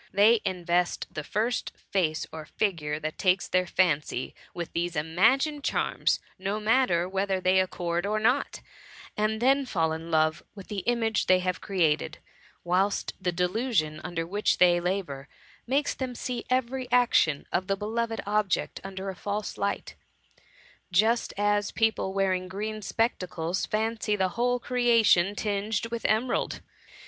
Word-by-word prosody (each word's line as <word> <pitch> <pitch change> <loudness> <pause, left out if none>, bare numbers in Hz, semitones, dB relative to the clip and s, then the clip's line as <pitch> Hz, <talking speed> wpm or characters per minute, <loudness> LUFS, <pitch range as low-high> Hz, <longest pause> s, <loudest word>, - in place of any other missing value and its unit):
They 210 +4 +5
invest 175 -1 0
the 155 - -4
first 220 +8 -1 0.2
face 160 -5 +1
or 160 -1 -7
figure 155 -6 -1
that 155 0 -5
takes 185 0 +2
their* 185 0 +1
fancy, 155 -8 0 0.2
with 170 -1 -6
these 170 0 -1
imagined 225 - +2
charms, - - +1 0.2
no 200 +3 -2
matter 215 -6 +2
whether 190 0 -1
they 185 +1 +3
accord 175 -1 -1
or 215 +1 0
not, 250 +6 +1 0.5
and 215 +1 0
then 270 +4 +3
fall 165 -7 0
in 165 +1 -6
love 155 -1 +2
with 195 -2 -11
the 205 - -2
image 230 -2 +1
they 185 - +6
have 185 0 -2
created 160 -5 0 0.2
— - - -29
whilst 185 +3 0
the 180 - 0
delusion 180 -3 0
under 170 -2 -3
which 205 +5 0
they 175 -1 +5
94 - - -7
THE 180 - 0
MUMMY. 195 +1 -1
labour^ 140 -4 -9 0.4
makes 280 +4 +1
them 255 -2 -4
see 245 0 -4
every 255 0 -1
action 240 -12 +3
of 185 - 0
the 195 -1 0
beloved 225 +2 -2
object 210 -1 0
under 195 0 -5
a - - -11
false 205 +3 -4
light; 200 - -2 1.0
just 220 +6 +2
as 205 0 +1
people 220 -3 +1
wearing 190 -1 0
green 215 +3 -4
spectacles 185 -4 -1
fancy 220 0 0
the 190 -2 +1
whole 245 +6 +1
creation 230 -7 +3
tinged 210 +2 -1
with 235 -1 -4
emerald. 220 +4 0
195 Hz, 155 wpm, -27 LUFS, 175-225 Hz, 1.0 s, they